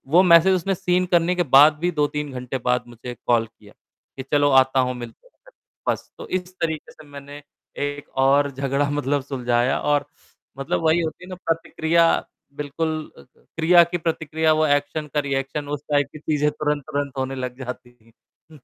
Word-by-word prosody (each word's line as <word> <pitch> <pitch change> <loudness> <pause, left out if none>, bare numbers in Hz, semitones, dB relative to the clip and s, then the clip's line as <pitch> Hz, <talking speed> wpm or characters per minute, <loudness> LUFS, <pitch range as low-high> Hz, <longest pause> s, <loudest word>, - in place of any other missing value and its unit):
वो 180 - +8
मैसेज 180 +3 +7
उसने 190 +2 -1
सीन 180 0 +1
करने 170 +2 +2
के 175 - +1
बाद 150 +2 +8
भी 180 - +2
2-3 150 -1 -1
घंटे 125 +1 -4
बाद 125 0 +2
मुझे 120 +1 -9
कॉल 115 -2 +3
किया 110 -2 -20 0.4
कि 130 - -5
चलो 145 -1 +4
आता 130 0 -2
हूँ - - -2
मिलते 120 - -10
हैं। - - -23 0.4
बस, - - -3
तो - - -9
इस 180 0 -4
तरीके 160 -2 -3
से 155 - -16
मैंने 145 0 -10 0.5
एक 145 0 -7 0.2
और 140 +1 +3
झगड़ा 140 +1 -1
मतलब 145 -1 0
सुलझाया 125 -1 0
और 145 -1 +1 0.5
मतलब 135 +4 -2
वही 160 +2 +3
होती 160 +2 -5
है - - -14
ना 185 - -6
प्रतिक्रिया 165 0 +1 0.5
बिल्कुल 150 +2 -3 0.3
क्रिया 165 - +2
की 170 +1 -3
प्रतिक्रिया 160 -1 0
वो 155 0 +2
एक्शन 145 +2 0
का 150 - +2
रिएक्शन 140 +1 -3
उस 145 0 -3
टाइप 145 -1 +2
की 155 - -9
चीज़ें 150 -1 0
तुरंत-तुरंत 145 -2 -3
होने 130 0 -2
लग 125 0 -8
जाती 125 -1 -8
हैं। 115 +6 -31
145 Hz, 175 wpm, -22 LUFS, 135-160 Hz, 0.5 s, वो